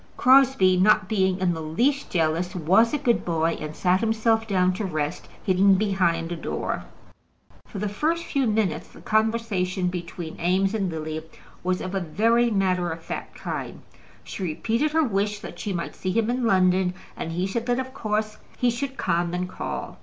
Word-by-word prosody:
Crosbie, 255 -8 +5
not 210 +1 +4
being 190 -3 +1
in 185 -2 +1
the 160 - -5
least 240 - 0
jealous, 170 +2 0
was 190 +7 +4
a 295 - +1
good 245 -5 +1
boy, 165 -1 0
and 155 0 -6
sat 180 +1 +2
himself 225 0 +1
down 185 -3 +2
to 210 - -4
rest, 155 -2 -3 0.2
hidden 190 +1 +4
behind 185 -5 +1
a - - -1
door. 165 - -3 0.8
For - - -8
the 210 +2 -1
first 315 +11 -1
few 275 -6 0
minutes 205 -7 0
the - - -16
conversation 215 -5 0
between 175 -2 -6
Eames 190 +3 +2
and 200 -4 0
Lily 155 -1 -4 0.4
was 185 0 0
of 185 - -5
a 195 - +1
very 230 +8 +2
matter 185 -4 +1
of 165 0 -7
fact - - -6
kind. - - -5 0.4
She - - -8
repeated 225 - 0
her 320 0 +4
wish 205 -4 0
that - - -9
she 210 - -3
might 170 -3 -3
see 185 - -4
him 230 +3 +1
in 250 0 -1
London, 185 -2 +3 0.2
and 165 - -5
he 180 +2 -1
said 230 +5 -3
that 245 0 +2
of 260 0 -4
course 215 -3 -2 0.2
he 245 -1 +2
should 270 +3 -4
come 175 0 0
and 180 0 -2
call. - - -6
190 Hz, 185 wpm, -25 LUFS, 175-225 Hz, 0.8 s, Crosbie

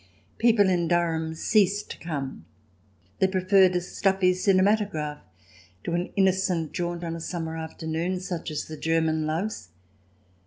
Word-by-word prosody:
People 225 -4 +5
in 175 -2 +1
Durham 160 -2 0
ceased 205 +3 +2
to - - -8
come; 140 - -5 0.7
they 190 - +4
preferred 190 0 +4
a 180 - +1
stuffy 190 +1 +1
cinematograph 185 -5 +1 0.6
to 170 - -3
an 175 +1 -1
innocent 190 -4 +1
jaunt 175 0 -3
on 165 -1 -3
a 165 - -7
summer 160 -1 -4
afternoon 160 +2 -3
such 180 -2 -4
as 155 - -3
the 155 - -8
German 160 -1 +1
loves. 170 - -3
175 Hz, 140 wpm, -26 LUFS, 160-190 Hz, 0.7 s, People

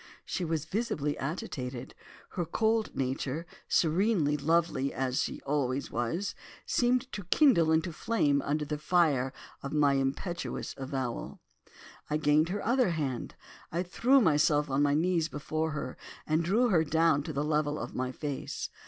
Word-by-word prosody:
"She 185 - -3
was 160 -2 -1
visibly 160 -7 -1
agitated. 135 - -5 0.4
Her 175 - -2
cold 220 +6 0
nature, 135 +4 -2 0.2
serenely 170 -2 +2
lovely 155 -2 +1
as 130 -1 -1
she - - -3
always 140 -2 -1
was, 165 - -2 0.3
seemed 250 +1 +1
to 200 - -6
kindle 180 - +4
into 160 +1 +1
flame 150 -8 +1
under 150 +2 -1
the 150 0 -3
fire 150 -6 +2 0.3
of 140 - -5
my 145 -2 +4
impetuous 140 +6 -2
avowal. 130 -3 -4 0.7
I 150 - +1
gained 155 +2 +3
her 200 +2 -3
other 245 -2 +3
hand, 145 -7 -3 0.4
I 170 +2 0
threw 245 +9 +3
myself 150 - +3
on 135 +2 +2
my 145 0 +3
knees 165 0 +1
before 155 +2 -2
her, 150 -4 -5 0.3
and 155 +2 +1
drew 220 +8 +2
her 170 -6 +4
down 160 -1 +3
to 155 - -5
the 145 0 -1
level 150 -1 0
of 120 - -5
my 130 0 -2
face. 145 0 -4
155 Hz, 155 wpm, -30 LUFS, 140-175 Hz, 0.7 s, kindle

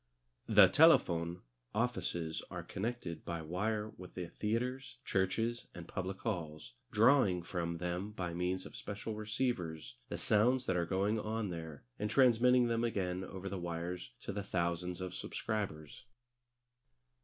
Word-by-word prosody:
The - - +8
Telefon 85 +1 +5 0.3
offices 95 -9 -1
are - - -5
connected 100 -6 -4
by 85 -2 -4
wire 105 +6 -1
with 90 -1 -10
the 90 -2 -4
theatres, 125 +6 -2
churches, 110 +5 0
and 85 -1 -8
public 95 +1 -4
halls, 80 - -4 0.2
drawing 110 -6 +4
from 85 -1 -2
them 90 +3 -2
by 90 -5 -4
means 90 +2 -1
of - - -10
special 105 +2 -5
receivers 105 - -2
the - - -3
sounds 125 +4 +3
that 95 - +1
are 85 -1 +1
going 100 +4 +1
on 110 -2 -2
there, 80 -4 -7 0.2
and 105 +1 -1
transmitting 125 0 +5
them 115 0 +1
again 95 -5 -1
over 95 +1 -6
the 95 -1 -3
wires 85 +1 -4
to - - -4
the 100 - -2
thousands 90 -1 -1
of 90 -1 -4
subscribers. 95 - -4
95 Hz, 145 wpm, -35 LUFS, 85-110 Hz, 0.3 s, The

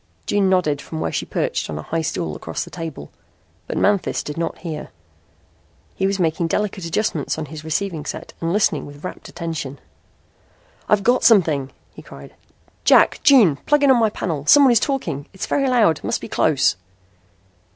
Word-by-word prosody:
June 200 -2 +1
nodded 155 -6 +1
from 160 - -7
where - - -2
she - - -3
perched - - -2
on 75 - -4
a 75 - -6
high 165 0 -2
stool 80 - -3
across 80 - -5
the - - -12
table. 160 - -7 0.6
But - - -4
Manthis 200 -2 +1
did 150 - -6
not 165 0 -3
hear. 160 -4 -6 1.0
He 190 - 0
was 195 0 -1
making 165 -1 0
delicate 195 0 -2
adjustments 165 -4 -1
on 160 - -4
his 155 +1 -9
receiving 160 -1 -3
set - - -6
and 165 0 -1
listening 205 +2 +1
with 145 +1 -13
rapt 185 - -7
attention. 165 -5 -5 1.1
"I've 210 -1 +3
got 245 +3 +2
something," 160 - +4 0.2
he - - -11
cried. - - -13 0.5
"Jack. - - +5
June. 235 - +6
Plug 295 -1 +3
in 280 - +6
on 250 - +4
my 220 -1 +3
panel. 160 -8 -4
Someone 280 -3 +7
is 235 - +5
talking. 235 - -3
It's 190 - -5
very 275 -2 0
loud. 215 -11 +3
Must - - -1
be - - -8
close." 140 -10 +2
170 Hz, 180 wpm, -21 LUFS, 150-210 Hz, 1.1 s, Someone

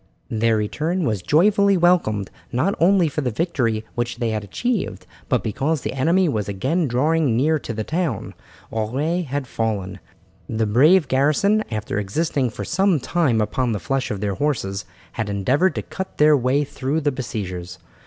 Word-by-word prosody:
Their 115 0 +2
return 155 - -1
was 110 -5 -1
joyfully 200 - +4
welcomed, 165 - +2 0.2
not 130 +11 +1
only 180 0 +4
for 150 0 -2
the 130 - 0
victory 115 -5 -1
which 120 0 -2
they 115 -2 -1
had 110 -1 -2
achieved, 230 - -2 0.2
but - - +1
because 135 +7 -1
the - - -3
enemy 170 +8 +2
was 110 -9 -1
again 140 - 0
drawing 135 0 +2
near 155 +4 +2
to 125 - -6
the 110 -1 -3
town. 160 - -2 0.4
Auray 135 +11 -1
had 140 0 -3
fallen. 100 -6 -3 0.5
The 110 0 0
brave 150 - +5
garrison, 150 +12 +2
after 110 -2 -3
existing 130 +5 -1
for 110 - -6
some 190 -2 +2
time 135 -5 +1
upon 115 +3 0
the 105 - -2
flesh 135 +9 -2
of 100 -2 -4
their 100 -1 -1
horses, 100 -5 -2 0.3
had 110 -3 -3
endeavoured 130 - +1
to - - -3
cut 190 0 -7
their 150 0 +6
way 135 +2 +2
through 140 +2 -2
the 145 -1 +1
besiegers. 90 - -5
130 Hz, 170 wpm, -22 LUFS, 110-160 Hz, 0.5 s, their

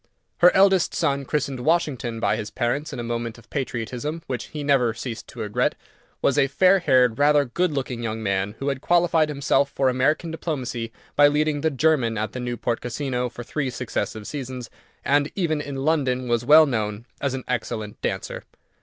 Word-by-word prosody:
Her 175 +1 +7
eldest 190 -2 +4
son, 140 0 0
christened 140 -2 -2
Washington 130 -5 0
by - - +1
his 105 -1 -4
parents 130 +6 -2
in - - -6
a - - -3
moment 115 -1 -3
of 115 - -19
patriotism, 135 +4 -3
which 125 -2 -4
he 150 -1 -6
never 130 -5 +2
ceased 115 -1 -6
to 120 - -8
regret, 105 -1 0 0.5
was 140 - +3
a 135 - +4
fair 185 +7 +4
haired, 125 -7 +3
rather 145 0 +4
good 175 +8 0
looking 130 -4 -3
young 110 -1 -3
man, 100 +1 -1
who 135 - -2
had 135 -1 -3
qualified 170 -2 +3
himself 140 -1 +1
for 135 -2 +1
American 140 +6 +1
diplomacy 130 -8 -4 0.2
by 145 0 +7
leading 150 0 +1
the 160 - +2
German 135 -6 +1
at 110 0 -2
the 125 - -6
Newport 120 -1 -2
Casino 125 0 -2
for 120 - -8
three 135 +2 -2
successive 115 -3 -4
seasons, 130 -3 -6 0.3
and 145 +1 +2
even 160 -6 0
in 145 -1 -6
London 135 -3 0
was 120 0 +1
well 155 +5 +8
known 110 -4 -2 0.2
as 140 -2 0
an 130 - -5
excellent 110 -4 -3
dancer. - - -3
130 Hz, 185 wpm, -24 LUFS, 120-150 Hz, 0.5 s, well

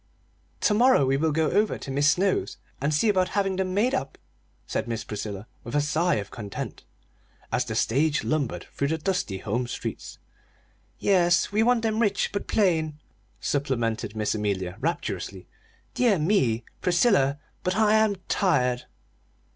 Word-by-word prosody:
"To 210 - +3
morrow 240 - +5
we 135 +1 +2
will 155 +3 +1
go 160 +1 +1
over 210 +1 +2
to 135 - -7
Mis' 145 +2 +3
Snow's 190 +3 +1 0.2
and 140 +2 +1
see 150 +9 +2
about 185 -3 +2
having 195 -2 +1
them 185 -1 -1
made 240 +6 +2
up," 135 - -2 0.5
said 110 - -3
Miss 115 -1 -3
Priscilla 105 -1 -5 0.2
with 120 - -6
a - - +4
sigh 155 +4 +1
of 100 -2 -4
content, 105 -3 -6 0.7
as - - +1
the - - -4
stage 145 +5 +1
lumbered 155 -5 -1
through 140 - -1
the 160 +2 0
dusty 160 - -1
home 115 +5 -2
streets. - - -6 0.8
"Yes; 175 -3 +3
we 210 +2 +2
want 235 0 +3
them 220 -1 0
rich, 205 -3 +1
but 200 - -3
plain," 160 -7 +1 0.4
supplemented 115 -6 -1
Miss 105 -1 0
Amelia, 100 -4 -2
rapturously. 165 +5 -3 0.5
"Dear 235 -6 +3
me, 150 - +2 0.2
Priscilla, 175 - +3 0.2
but 180 0 -1
I 215 0 +4
am 220 -2 +3
tired!" 125 -10 +1
155 Hz, 155 wpm, -26 LUFS, 125-200 Hz, 0.8 s, morrow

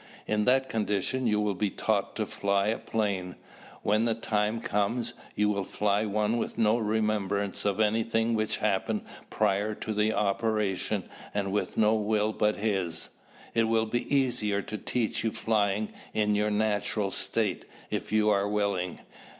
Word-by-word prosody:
In 105 0 +1
that 130 +1 +4
condition 110 +3 0
you 105 -1 +2
will 105 -1 +1
be 100 +2 0
taught - - -1
to - - -1
fly 100 0 +1
a 115 - -1
plane. 100 -5 -2 0.5
When 105 +2 +2
the 115 -1 +1
time 110 0 0
comes, 110 +3 -1 0.2
you 105 - +2
will 100 -1 0
fly 105 +2 0
one 105 +2 +1
with - - -3
no 110 +1 +3
remembrance 105 -3 0
of 100 0 +1
anything 115 +1 +2
which 110 -1 0
happened 105 +1 0 0.3
prior 105 0 +1
to 110 - -4
the 105 +1 +2
operation 105 -1 0 0.3
and 100 -1 0
with 105 - -2
no 110 0 +5
will 110 0 +1
but 105 0 +2
his. 95 -6 -1 0.4
It 115 -1 +3
will 110 0 +2
be 120 +2 -3
easier 115 -7 +1
to 110 - -5
teach 115 +2 -1
you 115 - +1
flying 105 -1 0 0.2
in 105 -1 +2
your 105 +1 +2
natural 105 -1 0
state 105 -3 -1 0.3
if - - -3
you 110 0 +4
are 100 0 +2
willing. 100 -4 -1
105 Hz, 160 wpm, -28 LUFS, 100-110 Hz, 0.5 s, no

